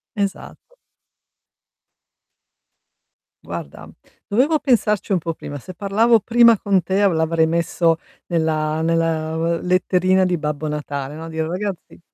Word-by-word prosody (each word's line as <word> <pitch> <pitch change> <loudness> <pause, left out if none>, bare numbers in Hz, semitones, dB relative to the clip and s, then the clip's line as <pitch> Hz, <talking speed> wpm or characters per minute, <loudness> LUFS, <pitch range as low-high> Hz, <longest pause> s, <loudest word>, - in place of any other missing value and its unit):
Esatto. 200 - -5 2.7
Guarda, - - -8 0.4
dovevo 265 +10 +2
pensarci 210 -5 +1
un 190 - +3
po' 165 -1 -3
prima. 145 -2 -8
Se 185 - -10
parlavo 210 +5 +2
prima 235 0 +5
con 195 -2 +1
te 190 +3 -1
a 200 - +5
l'avrei 160 -1 +1
messo 165 0 +1 0.3
nella 160 -2 0
nella, 165 -1 0
uhm, 165 +1 0
letterina 185 +1 +2
di 180 -2 +1
Babbo 150 0 -3
Natale, 145 -1 -4
no, 160 +1 -8
dire: 160 -1 -3
"Ragazzi" 185 +3 -5
170 Hz, 125 wpm, -20 LUFS, 160-200 Hz, 2.7 s, prima